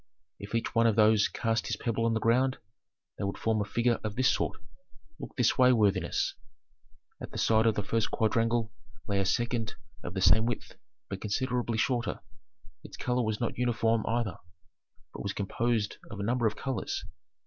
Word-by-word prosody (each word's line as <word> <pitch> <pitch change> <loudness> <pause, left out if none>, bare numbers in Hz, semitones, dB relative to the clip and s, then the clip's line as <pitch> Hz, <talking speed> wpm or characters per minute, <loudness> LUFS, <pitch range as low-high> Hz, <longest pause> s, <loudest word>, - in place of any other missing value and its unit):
If 100 +3 -6
each 115 - -1
one 115 0 +4
of 110 - +2
those 110 -1 +5
cast 115 -1 -1
his - - -1
pebble 115 -1 -1
on 115 - +1
the - - +1
ground, 125 +4 +2 0.6
they - - -2
would 100 0 -2
form 110 -1 0
a - - +2
figure 120 +3 +1
of 105 -1 -3
this 130 +1 +3
sort. - - -2 0.6
Look - - -8
this 125 0 +2
way, 130 0 +7
worthiness." 100 -5 +1 0.9
At - - -6
the - - -8
side 110 0 +3
of 110 - +3
the 105 - -1
first 115 +1 0
quadrangle 115 0 +1 0.4
lay 100 -2 +1
a 95 - +1
second 120 +1 -1 0.3
of 90 - -6
the 95 - -1
same 95 +6 +5
width, 120 - -4 0.3
but 100 -1 -6
considerably 120 +2 -1
shorter; 120 0 0 0.6
its - - -11
color 125 0 0
was 110 -2 -1
not 120 0 -2
uniform 115 -2 +1
either, 115 -3 -1 0.8
but - - -7
was 100 -1 -3
composed 110 +1 -1
of 100 - -7
a - - -2
number 120 +2 +1
of 110 - -2
colors. 135 +1 -3
115 Hz, 185 wpm, -29 LUFS, 105-120 Hz, 0.9 s, way